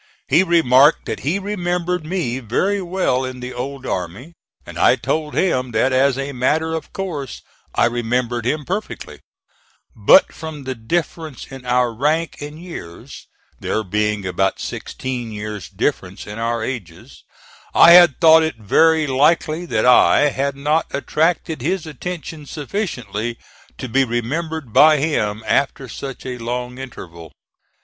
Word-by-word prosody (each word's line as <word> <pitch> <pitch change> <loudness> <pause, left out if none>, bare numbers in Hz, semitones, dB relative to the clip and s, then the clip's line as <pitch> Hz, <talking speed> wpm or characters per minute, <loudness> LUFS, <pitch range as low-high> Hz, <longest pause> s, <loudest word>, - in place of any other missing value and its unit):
He 170 - +5
remarked 155 -5 +4
that - - -4
he 155 +8 -1
remembered 180 -4 -2
me 155 -9 -2
very 190 - 0
well 175 -8 0
in 130 -1 -6
the 125 +1 -6
old 135 +2 -6
army; 100 - -5 0.3
and - - -8
I - - +5
told 155 -1 -3
him 130 -9 0
that 130 +4 +2
as 135 0 +3
a 135 +1 -3
matter 155 +5 0
of 160 -2 -5
course 155 -9 -5 0.3
I - - +4
remembered 120 0 -1
him 150 +5 -1
perfectly, 200 +4 -5 0.8
but 285 - +5
from 160 -3 -8
the 130 0 -3
difference 155 +4 -4
in 130 -2 -10
our 125 -1 +2
rank 155 +7 0
and 150 +2 -8
years 165 - -10 0.3
(there 110 - -2
being 105 +1 -1
about 95 +1 0
sixteen 125 -3 -5
years' 105 -3 -6
difference 95 -2 -3
in 105 +2 -8
our 115 +1 -1
ages), 95 -11 -7 0.5
I 170 - +8
had 175 -5 +7
thought 160 -1 +7
it 160 -1 -1
very 160 +9 +3
likely 155 +5 +1
that 110 -7 0
I 135 +3 +5
had 140 +1 -2
not 150 +3 0
attracted 160 +1 -1
his 175 +5 -1
attention 160 -1 -7
sufficiently 125 - -4 0.4
to 130 - -5
be 135 +3 +2
remembered 135 +3 -3
by 155 0 +7
him 110 -8 -1
after 135 -1 0
such 135 +3 -8
a 125 -1 -5
long 125 +2 -4
interval. 85 - -10
135 Hz, 145 wpm, -20 LUFS, 120-160 Hz, 0.8 s, I